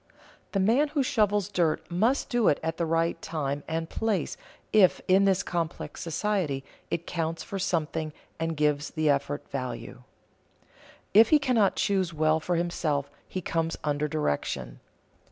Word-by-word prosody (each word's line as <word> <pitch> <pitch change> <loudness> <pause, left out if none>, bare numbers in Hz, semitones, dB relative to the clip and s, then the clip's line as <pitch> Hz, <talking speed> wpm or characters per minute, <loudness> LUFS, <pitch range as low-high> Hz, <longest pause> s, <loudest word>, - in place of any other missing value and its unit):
The 195 - +1
man 235 +10 +4
who 290 -1 0
shovels 210 -5 +2
dirt 170 -6 0
must 225 +10 +2
do 240 -4 +2
it 145 - +4
at 160 0 -2
the 170 - 0
right 165 +1 +1
time 145 -3 -2
and 165 0 -2
place 205 -3 -1 0.4
if, 200 -4 +5
in 190 +2 +5
this 195 -1 +3
complex 165 -3 -3
society, 165 -5 -1 0.3
it 170 - -2
counts 165 -1 -2
for 195 - -5
something 160 -3 -1 0.3
and 165 -1 -2
gives 150 -1 +1
the 155 -2 +2
effort 140 +1 -2
value. 125 -3 -5 1.1
If 220 +3 +7
he 305 - +7
cannot 250 -8 +2
choose 190 -4 0
well 155 +1 +3
for 175 +2 -1
himself, 155 -4 -1 0.2
he 185 - -4
comes 165 0 -1
under 150 0 0
direction. 70 - -2
165 Hz, 155 wpm, -27 LUFS, 150-195 Hz, 1.1 s, If